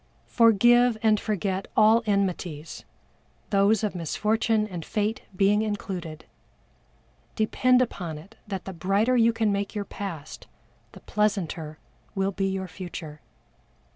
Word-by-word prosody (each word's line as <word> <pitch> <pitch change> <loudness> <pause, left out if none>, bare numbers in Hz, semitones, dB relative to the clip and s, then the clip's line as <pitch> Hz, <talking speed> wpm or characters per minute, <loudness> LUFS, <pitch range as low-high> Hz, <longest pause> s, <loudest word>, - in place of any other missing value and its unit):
Forgive 240 +1 +4
and 215 -1 +4
forget 195 -2 -2
all 220 +2 +6
enmities 180 -6 -2 0.7
those 200 +2 +3
of 210 - -1
Misfortune 215 +5 0
and 175 -5 -6
Fate 215 +4 -2
being 205 +2 +3
included. 185 -7 -5 1.1
Depend 250 +3 +3
upon 175 -9 -5
it 195 +9 -14
that 195 -3 -5
the 190 - -6
brighter 195 +8 +1
you 230 -1 +5
can 225 -2 0
make 200 +1 -2
your 205 -1 -2
Past 170 -8 -7 0.5
the - - -13
pleasanter 175 -7 -2 0.4
will 195 0 0
be 195 0 -1
your 190 -1 -3
Future. 165 -4 -8
200 Hz, 125 wpm, -26 LUFS, 180-215 Hz, 1.1 s, all